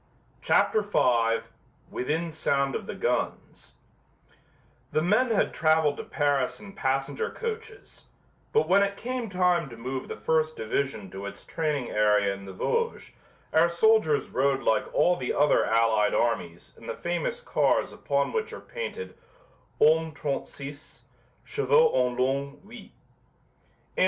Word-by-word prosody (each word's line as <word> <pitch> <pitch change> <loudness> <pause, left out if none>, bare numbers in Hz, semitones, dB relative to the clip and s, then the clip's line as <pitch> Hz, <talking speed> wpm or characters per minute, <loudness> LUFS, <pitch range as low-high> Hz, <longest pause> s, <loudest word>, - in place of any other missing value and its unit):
CHAPTER 215 - +3
V 120 - +2 0.5
WITHIN 160 +6 -2
SOUND 140 -3 0
OF - - -4
THE - - -5
GUNS - - -3 1.2
The 155 - +1
men 215 +8 +3
had 220 - +1
traveled 155 -2 +2
to - - -5
Paris 145 -3 0
in 205 -2 -11
passenger 135 -4 -1
coaches, 445 -2 -7 0.5
but 450 - +2
when 200 - +5
it 200 0 0
came 245 -1 -4
time 180 -4 +1
to 115 - -11
move 130 +3 -5
the - - -5
first 155 0 0
division 110 -3 -2
to 95 +1 -6
its - - -10
training 150 -6 -2
area 105 -2 +3
in 100 0 -10
the 95 - -8
Vosges 465 - -2 0.4
our 165 +2 +5
soldiers 170 -4 +3
rode 135 0 +1
like 110 - +1
all 180 0 +3
the 125 - -2
other 145 +1 +4
allied 110 -2 +2
armies 110 -8 -1
in - - -14
the - - -3
famous 175 -2 -2
cars - - +1
upon 140 0 -1
which 445 -1 -2
are - - -7
painted 475 -1 -6 0.6
"Hommes 160 -1 +3
36; 140 0 -6 0.4
chevaux 470 0 +3
en 125 -1 +1
long, 140 +2 -1
8." 245 - -11
145 Hz, 140 wpm, -27 LUFS, 125-190 Hz, 1.2 s, when